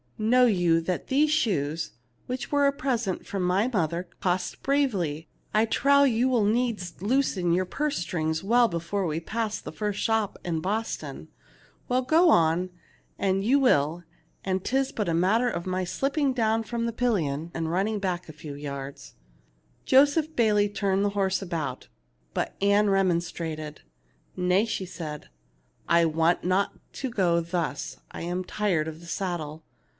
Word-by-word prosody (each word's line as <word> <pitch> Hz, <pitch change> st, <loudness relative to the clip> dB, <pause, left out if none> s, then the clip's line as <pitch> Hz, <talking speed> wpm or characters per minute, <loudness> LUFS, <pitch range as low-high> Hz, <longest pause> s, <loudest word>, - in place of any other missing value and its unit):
Know 245 Hz, +4 st, +4 dB
you 175 Hz, -7 st, +3 dB
that 180 Hz, +2 st, -3 dB
these 295 Hz, +3 st, +3 dB
shoes, 165 Hz, -, 0 dB, 0.4 s
which 255 Hz, +1 st, -4 dB
were 285 Hz, -1 st, +4 dB
a -, -, +4 dB
present 245 Hz, -9 st, -2 dB
from 195 Hz, -, -3 dB
my 185 Hz, +5 st, +2 dB
mother, 175 Hz, -6 st, -1 dB
cost 180 Hz, 0 st, -1 dB
bravely? 195 Hz, -, 0 dB, 0.3 s
I 215 Hz, +1 st, +4 dB
trow 280 Hz, +5 st, +4 dB
you 250 Hz, -2 st, +3 dB
will 240 Hz, -4 st, +2 dB
needs 215 Hz, -5 st, -1 dB
loosen 205 Hz, -6 st, +1 dB
your 185 Hz, +2 st, +2 dB
purse 295 Hz, +9 st, -2 dB
strings 160 Hz, -1 st, -2 dB
well 235 Hz, +4 st, +4 dB
before 175 Hz, +2 st, -2 dB
we 155 Hz, 0 st, -1 dB
pass 220 Hz, +5 st, -3 dB
the -, -, -8 dB
first 210 Hz, -1 st, -3 dB
shop 225 Hz, -2 st, 0 dB
in 165 Hz, -2 st, -1 dB
Boston. 215 Hz, +7 st, -4 dB, 0.6 s
Well, 255 Hz, +1 st, +1 dB
go 325 Hz, +7 st, +4 dB
on, 170 Hz, -, +3 dB, 0.5 s
an' 195 Hz, 0 st, +1 dB
you 265 Hz, +7 st, +4 dB
will, 170 Hz, -, +2 dB, 0.4 s
when 190 Hz, 0 st, 0 dB
'tis 265 Hz, +7 st, 0 dB
but 210 Hz, -5 st, -2 dB
a -, -, +1 dB
matter 205 Hz, +9 st, +3 dB
of 170 Hz, -6 st, -4 dB
my 185 Hz, 0 st, -1 dB
slipping 275 Hz, -, 0 dB
down 225 Hz, -2 st, +1 dB
from 230 Hz, +1 st, -3 dB
the 235 Hz, -, -2 dB
pil 245 Hz, +1 st, +1 dB
lion 155 Hz, -3 st, -2 dB
and 165 Hz, -1 st, -2 dB
running 200 Hz, +5 st, 0 dB
back 180 Hz, -3 st, -3 dB
a -, -, -8 dB
few 150 Hz, -1 st, -8 dB
yards/' 140 Hz, -1 st, -7 dB, 0.7 s
Joseph 290 Hz, +4 st, +4 dB
Bayley 210 Hz, -3 st, +3 dB
turned 200 Hz, -1 st, 0 dB
his 205 Hz, 0 st, 0 dB
horse 190 Hz, -1 st, 0 dB
about; 160 Hz, -8 st, -4 dB, 0.5 s
but -, -, -2 dB
Ann 200 Hz, +1 st, +4 dB
remonstrated. 170 Hz, -5 st, -1 dB, 0.5 s
"Nay," 185 Hz, +3 st, +2 dB
said 175 Hz, -8 st, -5 dB
she; -, -, -24 dB, 0.3 s
" -, -, -38 dB
I 170 Hz, 0 st, +5 dB
want 165 Hz, +2 st, +2 dB
not 185 Hz, +2 st, +1 dB, 0.2 s
to 265 Hz, -, -4 dB
go 180 Hz, -7 st, +2 dB
thus. 170 Hz, -3 st, -3 dB
I -, -, -7 dB
am 175 Hz, +2 st, -2 dB
tired 180 Hz, -5 st, 0 dB
of 160 Hz, 0 st, -7 dB
the 170 Hz, -, -13 dB
saddle. 165 Hz, -5 st, -4 dB
190 Hz, 165 wpm, -26 LUFS, 170-230 Hz, 0.7 s, I